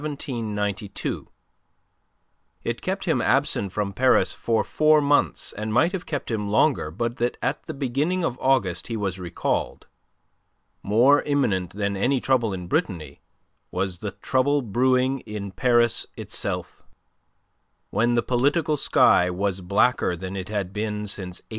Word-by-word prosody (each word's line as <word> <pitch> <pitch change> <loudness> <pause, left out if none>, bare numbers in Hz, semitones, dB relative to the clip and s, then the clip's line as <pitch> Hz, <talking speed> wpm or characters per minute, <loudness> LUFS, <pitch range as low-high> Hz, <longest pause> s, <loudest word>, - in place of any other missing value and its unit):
It 110 -9 -3 1.9
kept - - -3
him - - +1
absent 100 -2 +1
from 100 0 -2
Paris 130 +6 +3
for 115 -2 0
four 155 0 +4
months 145 0 +1
and 110 +1 -4
might 160 +11 +3
have 190 -3 -5
kept 145 -5 -4
him 105 -2 -2
longer 110 - +2
but 115 +8 -3
that 120 +1 -1
at 130 +4 -3
the - - -5
beginning 145 +7 -1
of 130 -6 -2
August 130 -10 +1
he 115 - -3
was 95 -3 -3
recalled. 85 -1 -2 1.0
More 125 +8 +4
imminent 105 - 0
than 100 0 -2
any 125 +7 +1
trouble 120 -4 +1
in 90 -2 -5
Brittany 85 - -2 0.5
was 90 -1 -3
the 105 0 -5
trouble 140 +2 +1
brewing 130 +4 +2
in 105 -4 -7
Paris 120 +3 +2
itself; - - -4 1.1
when 120 +1 +2
the 120 - +2
political 145 +6 +1
sky 90 -8 +4
was 95 +1 -2
blacker 100 +1 +2
than 95 +3 -6
it 95 -1 -5
had 100 -3 -3
been 105 0 -3
since 95 -3 -4
'89. - - -40
110 Hz, 140 wpm, -24 LUFS, 100-130 Hz, 1.9 s, four